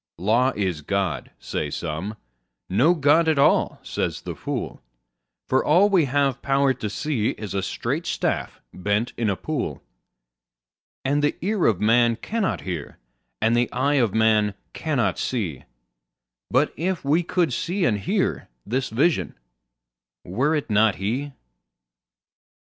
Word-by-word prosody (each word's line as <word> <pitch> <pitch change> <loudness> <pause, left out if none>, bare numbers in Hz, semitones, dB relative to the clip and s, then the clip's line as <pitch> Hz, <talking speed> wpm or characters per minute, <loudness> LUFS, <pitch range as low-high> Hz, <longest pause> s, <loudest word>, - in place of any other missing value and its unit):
Law 115 +7 +2
is 95 -6 -1
God, 95 +1 -2
say 75 - -3
some: 85 +8 -4 0.5
no 130 - +3
God 155 +2 +4
at 160 -2 +3
all, 140 - +3
says - - -3
the - - -5
fool; - - -5 0.7
For 130 - +2
all 180 +7 +5
we 180 -6 +4
have 140 -1 +1
power 135 0 +2
to 105 - -4
see 120 -2 -1
is 105 -3 -6
a 100 - 0
straight - - -3
staff - - -2
bent 105 +5 -1
in 115 -2 0
a 100 - +1
pool; 120 - -4 1.2
And 145 +2 +2
the 150 - +2
ear 205 -3 +2
of 105 -6 +2
man 115 +2 +4
cannot 215 - -2
hear, 85 -6 -5 0.5
and 115 +1 +3
the 120 0 +1
eye 140 +4 +1
of 110 -3 0
man 110 -2 +3 0.2
cannot 145 -6 0
see; 95 - -3 0.8
But - - +2
if 175 0 -2
we 155 +5 +3
could 170 -4 0
see 180 +8 -1
and 105 -7 +1
hear, 95 - -1 0.2
this 125 +4 -1
Vision—were - - -3
it 145 -7 -3
not 105 0 +4
He? 125 +9 -3
120 Hz, 140 wpm, -24 LUFS, 100-145 Hz, 1.2 s, all